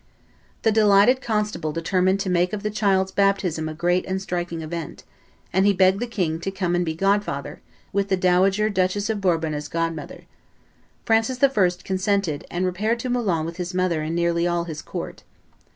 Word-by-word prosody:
The 225 - +4
delighted 215 +4 +5
constable 210 -8 -1
determined 185 +4 +1
to 190 - -2
make 180 +1 +1
of 210 0 -4
the 210 - -1
child's 190 -3 +1
baptism 190 -6 +1
a 155 - -7
great 175 +2 +1
and 190 0 -1
striking 175 -3 -4
event; 165 +1 -6 0.5
and 190 - +3
he 200 0 +4
begged 190 +1 +3
the 245 - -2
king 180 -8 -2
to 185 - -3
come 190 -2 -2
and 175 0 +2
be 160 -2 -3
godfather, 195 -6 -1 0.3
with 200 0 +1
the 190 - +2
dowager 190 +3 +3
Duchess 200 +1 0
of 210 -2 -3
Bourbon 165 -4 +1
as 150 0 -4
godmother. 165 -1 -4 0.8
Francis 225 +3 +2
I. 275 - +7 0.3
consented 190 -5 -1
and 180 +1 -1
repaired 210 +6 0
to 255 - -3
Moulins 195 -10 0
with 165 +1 -6
his 180 0 -4
mother 180 -3 +1
and 155 +2 -3
nearly 170 0 +1
all 175 -1 0
his 160 -3 -6
court. - - -7
185 Hz, 185 wpm, -23 LUFS, 170-200 Hz, 0.8 s, I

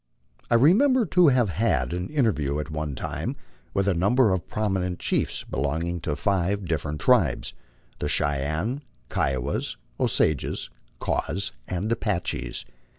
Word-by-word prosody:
I - - +4
remember 225 - +5
to 180 -1 +5
have 125 -6 +4
had 80 - +1
an 90 0 -3
interview 100 - +1
at 75 0 -4
one 75 -2 -3
time - - -3 0.4
with 100 0 +2
a 100 - +4
number 105 +5 +3
of 90 -3 -2
prominent 95 -5 -1
chiefs - - -1
belonging 80 +6 -2
to 75 - -1
five 100 +3 0
different 75 -2 -2
tribes, 95 - +3 0.5
the - - -1
Cheyennee, 80 - 0 0.3
Kiowas, 65 -2 -1 0.2
Osages, 75 -4 +1 0.4
Raws, 95 0 -1 0.2
and 95 +5 -2
Apaches. 105 -6 -2
90 Hz, 130 wpm, -26 LUFS, 75-115 Hz, 0.5 s, remember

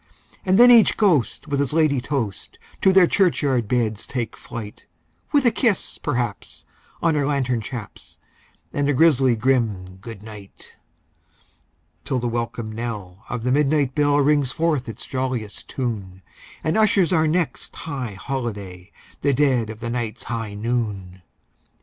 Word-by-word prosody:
And 190 0 +3
then 245 +1 +9
each 230 -3 +6
ghost 170 - +2
with 140 -1 -1
his 140 0 0
ladye 155 -5 +3
toast 120 - -4 0.2
to 190 - +5
their 190 -1 +7
churchyard 145 - +2
beds 110 -3 -1
take 120 -4 -3
flight, 110 -3 -9 0.4
With 285 -3 +3
a 240 - +6
kiss, 225 -7 0
perhaps, 120 -7 -3 0.4
on 165 -1 +3
her 145 -2 +1
lantern 130 -5 0
chaps, 110 -2 -9 0.6
and 145 0 0
a - - +3
grisly 135 -4 +4
grim 110 -7 0
"good 105 +1 -10
night"; 105 -3 -13 1.3
Till 135 -2 -1
the 120 0 -1
welcome 115 -1 -3
knell 110 -4 -6
of 120 -1 -4
the 125 - +1
midnight 145 -1 +2
bell 145 0 +3
rings 145 -2 +3
forth 155 -6 0
its 115 - -7
jolliest 130 -5 -4
tune, 100 -8 -4 0.4
And 160 +7 +1
ushers 200 -5 +3
our 160 -2 +3
next 170 +1 -2
high 130 -8 -5
holiday—the 100 +1 -4
dead 130 -5 +2
of 110 +1 -8
the 115 0 -3
night's 120 -2 -3
high 115 -3 -4
noon! 105 -5 -3
125 Hz, 145 wpm, -22 LUFS, 110-150 Hz, 1.3 s, then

